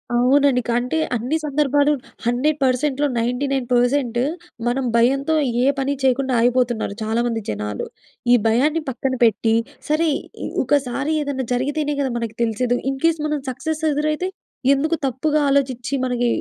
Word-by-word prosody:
అవునండి. 260 +1 +4
కంటే 245 +6 0 0.2
అన్ని 250 +7 -1
సందర్భాలు 290 0 +2 0.3
100%లో 275 +2 +1
99% 245 0 +1 0.5
మనం 255 +2 0
భయంతో 275 +6 +2 0.3
ఏ - - +3
పని 270 +1 0
చేయకుండా 265 0 +2
ఆగిపోతున్నారు 240 -3 +1
చాలామంది 230 +1 -1
జనాలు. 105 0 -3 0.5
ఈ - - +8
భయాన్ని 295 +8 +2
పక్కన 265 +1 -2
పెట్టి 225 0 +3 0.3
సరే 315 +1 +2 0.4
ఇ - - -2 0.2
ఒకసారి 280 +2 0
ఏదైనా 275 -3 -3
జరిగితేనే 290 +4 -1
కదా 265 -3 -1
మనకి 230 -2 -4
తెలిసేది. 240 +2 0
ఇన్‌కేస్ 320 +4 +1
మనం 300 -1 -1
సక్సెస్ 315 +5 -4
ఎదురైతే? 305 +5 -1 0.4
ఎందుకు 310 +4 +1
తప్పుగా 295 +5 0
ఆలోచిచి 275 -1 0
మనకి 245 -1 0
265 Hz, 125 wpm, -21 LUFS, 240-290 Hz, 0.5 s, ఈ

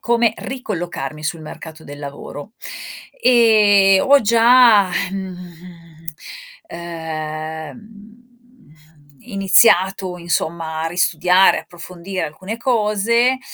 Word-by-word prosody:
come 235 -2 +1
ricollocarmi 175 - -6
sul 165 +1 -3
mercato 160 +1 -11
del 145 0 -10
lavoro. 145 +6 -9 0.7
E 210 - +4
ho 280 0 +5
già, 230 -2 +5 0.2
mhmm, 180 -3 -9 1.0
ehm, 160 - -7
mhmm, 220 +2 -17 0.9
iniziato 195 -3 +2
insomma 165 -2 -3
a - - -1
ristudiare, 180 +2 +2
approfondire 175 +1 -7
alcune 190 +8 -8
cose, 235 +1 +1
190 Hz, 85 wpm, -18 LUFS, 165-225 Hz, 1.0 s, ho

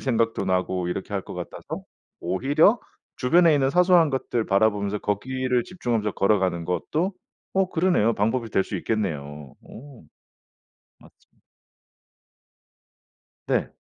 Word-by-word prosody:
생각도 115 -5 0
나고 90 -1 0
이렇게 95 +3 -5
할 95 - -1
것 - - -9
같아서 - - -7 0.4
오히려 145 - +3 0.4
주변에 165 +5 +4
있는 135 -2 +2
사소한 180 -1 +5
것들 125 -4 -2
바라보면서 100 0 +1
거기를 125 +5 -1
집중하면서 115 - -2
걸어가는 95 -4 +1
것도 155 - -1 0.4
어 190 -1 +2
그러네요. 160 - +2
방법이 115 +2 -1
될 95 - +1
수 - - -4
있겠네요. 75 - -4
어. 135 - -13 1.0
맞아 - - -18 2.4
네. - - 0
115 Hz, 275 characters per minute, -24 LUFS, 95-140 Hz, 2.4 s, 사소한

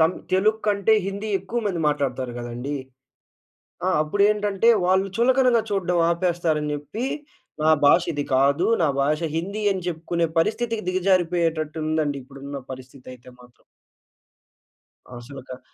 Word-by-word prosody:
తం 160 +2 +5 0.2
తెలుగు 215 +4 +3
కంటే 205 +1 +3
హిందీ 200 +2 -4
ఎక్కువ 225 +6 -3
మంది 180 -5 -1
మాట్లాడుతారు 130 -4 -2
కదండీ! 120 +4 -5 1.1
ఆ! - - +3
అప్పుడెంటంటే 205 +5 +2 0.2
వాళ్ళు 190 +1 +3
చులకనగా 250 -1 +3
చూడడం 180 -3 0
ఆపేస్తారని 170 -4 0
చెప్పి 145 - -5 0.6
నా 155 - +4 0.2
భాష 170 - +6
ఇది 145 -1 -2
కాదు. 140 +2 +3 0.2
నా 160 - +3
భాష 150 +3 +1 0.2
హిందీ 200 +6 -3
అని 190 -1 -4
చెప్పుకునే 170 0 -1
పరిస్థితికి 225 +4 0
దిగజారిపోయేటట్టు 170 -4 +1
ఉందండి. 155 -2 0
ఇప్పుడున్న 140 +1 -8
పరిస్థితి 130 0 -12
అయితే 125 0 -17
మాత్రం. 125 -1 -20 1.5
అసలక 130 +1 -10
165 Hz, 120 wpm, -23 LUFS, 145-195 Hz, 1.5 s, భాష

